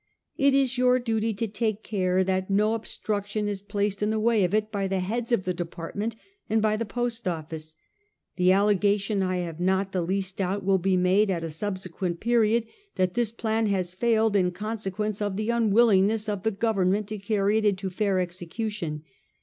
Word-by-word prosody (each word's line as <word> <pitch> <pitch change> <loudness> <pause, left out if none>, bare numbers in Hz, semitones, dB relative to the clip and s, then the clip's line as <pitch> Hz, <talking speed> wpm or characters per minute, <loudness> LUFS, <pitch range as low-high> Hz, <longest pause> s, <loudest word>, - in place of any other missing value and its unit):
It 275 -1 +3
is 265 -2 +2
your 250 0 +5
duty 225 -2 0
to 225 +3 -2
take 215 0 -2
care 185 -3 +1
that 190 0 -1
no 210 +3 +3
obstruction 210 -2 -3
is 200 -2 -3
placed 205 -1 -2
in 210 - +1
the 220 0 0
way 220 -2 +3
of 180 - +1
it 215 +1 0
by 200 -2 -1
the 190 0 -1
heads 230 +6 -2
of 235 -6 +2
the 185 - -1
department, 175 +6 -4 0.3
and 220 - +3
by 215 0 +2
the 225 0 -3
Post 240 0 -3
Office. 160 -2 -5 0.6
The 180 0 +4
allegation, 200 +1 +2
I 185 -1 0
have 165 -1 -7
not 190 +2 +1
the 185 - 0
least 190 +2 -2
doubt, 195 +1 -1
will 195 -1 +3
be 185 +1 +2
made 190 +3 +3
at 170 -3 -1
a 165 - -4
subsequent 185 -1 -4
period 230 -1 +2 0.3
that 185 -1 +1
this 240 -2 0
plan 225 -1 0
has 185 -3 -1
failed 225 +1 +2
in 185 -2 +3
consequence 210 +1 -3
of 205 -2 -1
the 215 +2 0
unwilling 220 -3 +4
ness 220 0 -1
of 205 -2 -2
the 220 - +1
Government 205 -2 +1
to 215 -1 -4
carry 205 +1 +1
it 215 - -2
into 195 -2 0
fair 200 +1 0
execu 180 +4 -3
tion. 155 -8 -5
205 Hz, 200 wpm, -26 LUFS, 185-220 Hz, 0.6 s, your